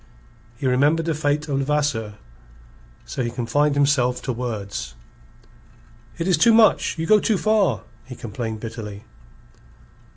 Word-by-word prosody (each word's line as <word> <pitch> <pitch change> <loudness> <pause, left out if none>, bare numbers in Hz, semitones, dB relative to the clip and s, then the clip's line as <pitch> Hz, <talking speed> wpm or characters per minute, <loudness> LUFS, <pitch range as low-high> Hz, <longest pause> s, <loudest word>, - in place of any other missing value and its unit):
He 135 - -6
remembered 145 +6 +2
the 165 - 0
fate 150 0 -1
of 140 -2 -1
Levasseur. 135 -7 -1 0.9
So - - -4
he 120 - -1
confined 125 +5 0
himself 140 -3 +2
to 130 - -2
words. 105 - -5 1.2
"It 165 - -2
is 180 -4 +2
too 230 +6 +6
much! 220 -5 +4
You 160 - -2
go 215 +4 +5
too 210 0 +1
far!" 215 -1 +1 0.2
he 125 - -9
complained 110 0 -5
bitterly. 110 -3 -7
135 Hz, 135 wpm, -22 LUFS, 115-155 Hz, 1.2 s, too